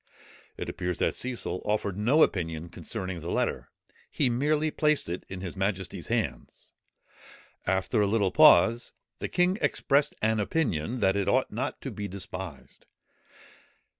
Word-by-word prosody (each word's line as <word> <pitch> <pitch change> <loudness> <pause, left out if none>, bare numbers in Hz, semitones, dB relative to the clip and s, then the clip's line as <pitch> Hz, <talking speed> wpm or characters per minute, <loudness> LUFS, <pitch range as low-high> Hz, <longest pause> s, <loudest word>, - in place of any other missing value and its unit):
It - - -5
appears 90 -1 -3
that - - +1
Cecil 120 -7 -3
offered 105 -2 -1
no 125 +10 +4
opinion 80 -2 -1
concerning 90 +1 -5
the 85 +2 -6
letter; - - -1 0.4
he 130 -4 +1
merely 150 +5 +1
placed 150 -1 +1
it 85 +2 -4
in 95 -1 -6
his 95 -1 -6
majesty's 95 -1 -3
hands. - - -3 0.9
After 95 +4 +1
a 105 - +3
little 100 -2 +2
pause, 115 +7 +6 0.3
the - - -3
king 180 +3 +2
expressed 140 +1 +2
an 110 0 +2
opinion 115 - -1
that 95 0 +3
it 100 -1 0
ought - - +2
not - - -3
to - - -5
be 105 - -5
despised. 90 -5 -8
100 Hz, 145 wpm, -28 LUFS, 90-125 Hz, 0.9 s, pause